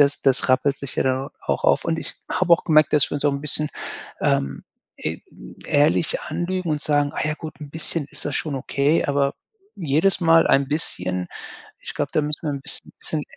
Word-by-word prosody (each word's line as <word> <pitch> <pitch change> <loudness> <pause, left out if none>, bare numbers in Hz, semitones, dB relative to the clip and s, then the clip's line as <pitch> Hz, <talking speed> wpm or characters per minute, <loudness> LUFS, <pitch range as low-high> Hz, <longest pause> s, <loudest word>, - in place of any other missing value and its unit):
das 145 0 +4
das 135 0 +2
rappelt 135 +2 +3
sich 140 - -7
ja - - +3
dann 130 +1 0 0.2
auch - - -1
auf. - - +3
Und 165 0 0
ich - - -5 0.2
habe 185 -2 +2
auch 170 - +5
gemerkt, 155 -2 +4
dass 150 -2 +4
wir - - -3
uns 145 - -2
auch 145 - +4
'n 140 - -3
bisschen, 150 0 0 0.5
ähm, 70 0 0 0.4
e - - -2 0.5
ehrlich 150 +2 +2
anlügen 175 +1 -2
und 150 -1 0
sagen: 145 -2 +1
„Ah - - -1
ja 155 - 0
gut, 155 0 -9
'n 145 - -7
bisschen 160 -1 -2
ist - - -5
das 145 - -2
schon 150 -3 -2
okay,“ 140 +4 +1
aber 140 -1 +1 0.4
jedes 170 +3 +2
Mal 165 -1 +5
ein 135 0 +4
bisschen 90 - -2 0.5
ich - - -7
glaube, - - -2
da 155 - +3
müssen 150 +2 -2
wir 155 - -1
'n 140 - -4
bisschen - - -6
bisschen 155 -2 -2
150 Hz, 210 wpm, -23 LUFS, 140-160 Hz, 0.5 s, auch